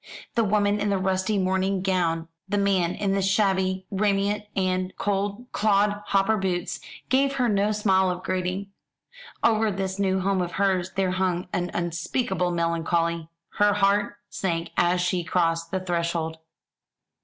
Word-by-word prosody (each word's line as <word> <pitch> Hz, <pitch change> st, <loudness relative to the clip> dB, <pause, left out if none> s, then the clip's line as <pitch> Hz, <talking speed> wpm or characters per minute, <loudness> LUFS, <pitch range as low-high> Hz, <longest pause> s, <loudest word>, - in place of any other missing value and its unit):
The 230 Hz, -, +2 dB
woman 205 Hz, 0 st, +2 dB
in 205 Hz, 0 st, 0 dB
the 200 Hz, -, +2 dB
rusty 190 Hz, +2 st, 0 dB
mourning 190 Hz, 0 st, 0 dB
gown, 170 Hz, -4 st, 0 dB, 0.2 s
the 205 Hz, -, 0 dB
man 190 Hz, -3 st, +2 dB
in 200 Hz, -2 st, -1 dB
the 195 Hz, 0 st, +1 dB
shabby 190 Hz, -1 st, +1 dB
raiment 205 Hz, +1 st, +1 dB
and 185 Hz, -1 st, 0 dB
clod 205 Hz, +3 st, -1 dB, 0.6 s
hopper 200 Hz, +3 st, +2 dB
boots, 180 Hz, -3 st, -2 dB, 0.3 s
gave 275 Hz, +2 st, +3 dB
her 250 Hz, -2 st, +2 dB
no 205 Hz, -1 st, +2 dB
smile 190 Hz, -3 st, +2 dB
of 180 Hz, 0 st, -4 dB
greeting. 185 Hz, +2 st, -2 dB, 0.7 s
Over 220 Hz, -1 st, +3 dB
this 190 Hz, 0 st, -3 dB
new 190 Hz, -1 st, +2 dB
home 190 Hz, 0 st, +1 dB
of 175 Hz, 0 st, -3 dB
hers 190 Hz, -2 st, 0 dB
there 190 Hz, -1 st, +1 dB
hung 185 Hz, -1 st, -1 dB
an 175 Hz, 0 st, -1 dB
unspeakable 175 Hz, +3 st, -1 dB
melancholy. 170 Hz, -1 st, 0 dB, 0.3 s
Her 205 Hz, 0 st, +5 dB
heart 200 Hz, 0 st, +2 dB
sank 170 Hz, -3 st, -2 dB
as 175 Hz, +1 st, +2 dB
she 180 Hz, 0 st, 0 dB
crossed 165 Hz, 0 st, 0 dB
the 190 Hz, -, -1 dB
threshold. 170 Hz, -3 st, -2 dB
190 Hz, 145 wpm, -25 LUFS, 175-200 Hz, 0.7 s, Her